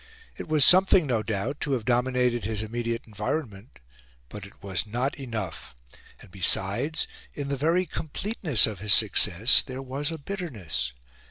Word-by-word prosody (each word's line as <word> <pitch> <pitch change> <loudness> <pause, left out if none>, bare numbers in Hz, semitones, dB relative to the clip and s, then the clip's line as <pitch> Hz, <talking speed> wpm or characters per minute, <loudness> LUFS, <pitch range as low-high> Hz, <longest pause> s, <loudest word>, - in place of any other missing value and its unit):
It - - -8
was 155 -3 +4
something, 185 -1 +6
no 120 -5 0
doubt, 110 +6 -3
to 145 - -1
have 120 -5 -2
dominated 125 -1 +1
his 110 +1 -2
immediate 115 +1 -4
environment; 105 - -5 0.5
but 105 -2 -9
it 100 - -21
was 100 +1 -2
not 125 +6 -1
enough; 110 - -6 0.4
and, - - -16
besides, 100 - 0 0.3
in 140 -1 -4
the 140 - -1
very 165 +7 +1
completeness 165 - +1
of 105 -4 -5
his 105 +1 +5
success, 105 +1 +4
there 130 0 -7
was 140 +4 -3
a 165 - -5
bitterness. 125 - -4
120 Hz, 155 wpm, -26 LUFS, 105-145 Hz, 0.5 s, something